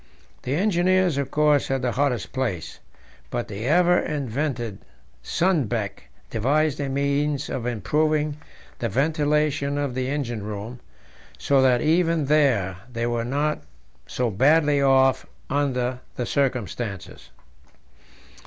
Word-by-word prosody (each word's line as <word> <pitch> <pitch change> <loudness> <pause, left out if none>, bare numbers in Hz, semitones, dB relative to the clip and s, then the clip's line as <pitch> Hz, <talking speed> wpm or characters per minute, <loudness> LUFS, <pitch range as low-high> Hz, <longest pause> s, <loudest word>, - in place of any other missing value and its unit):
The 130 +3 -2
engineers, 185 -3 +2
of 140 -1 -2
course, 150 -1 +3
had 135 -1 -1
the 125 - +1
hottest 135 -2 -1
place, 115 - -3 0.5
but - - -3
the 100 +3 -6
ever 180 +3 +4
inventive 130 -6 -3 0.4
Sundbeck 120 - -1 0.2
devised 145 +6 +1
a 140 -1 -2
means 140 +1 0
of 120 -2 -3
improving 150 +6 0 0.4
the 115 - -1
ventilation 145 - +1
of 145 -3 -1
the 130 0 -2
engine 125 -6 -2
room, 105 +4 -6 0.6
so 140 -1 +2
that 125 -2 +4
even 165 -1 +2
there 130 -11 +2
they 115 -1 -2
were 120 -1 -1
not 145 +4 -1 0.5
so 125 -2 -1
badly 145 +6 +3
off 135 -1 +3 0.2
under 130 -3 0 0.2
the 125 - -2
circumstances. 120 - -3
135 Hz, 120 wpm, -24 LUFS, 120-150 Hz, 0.6 s, ever